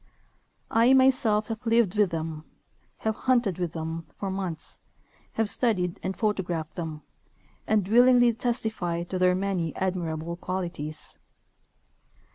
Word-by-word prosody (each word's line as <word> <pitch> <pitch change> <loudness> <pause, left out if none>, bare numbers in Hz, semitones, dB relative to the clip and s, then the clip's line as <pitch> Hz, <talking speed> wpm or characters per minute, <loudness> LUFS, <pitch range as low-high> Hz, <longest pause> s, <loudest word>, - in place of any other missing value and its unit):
I. 230 +3 +5
myself 255 -5 +4
have 225 +1 -4
lived 225 -4 +2
with 210 -2 +3
them, 160 -2 -4 0.6
have 220 - +2
hunted 235 -9 +1
with 175 -2 -2
them 160 0 -5
for 195 -2 -3
months, 185 -4 -5 0.5
have 225 -1 0
studied 195 -6 +1
and 190 0 -3
photographed 175 -7 -1
them, 160 -3 -6 0.6
and 210 -4 +2
willingly 245 +2 +6
testify 220 -8 -2
to 185 +1 -4
their 180 0 +4
many 185 -4 -1
admirable 170 -3 -2
qualities. 170 -5 -5
190 Hz, 120 wpm, -27 LUFS, 170-225 Hz, 0.6 s, willingly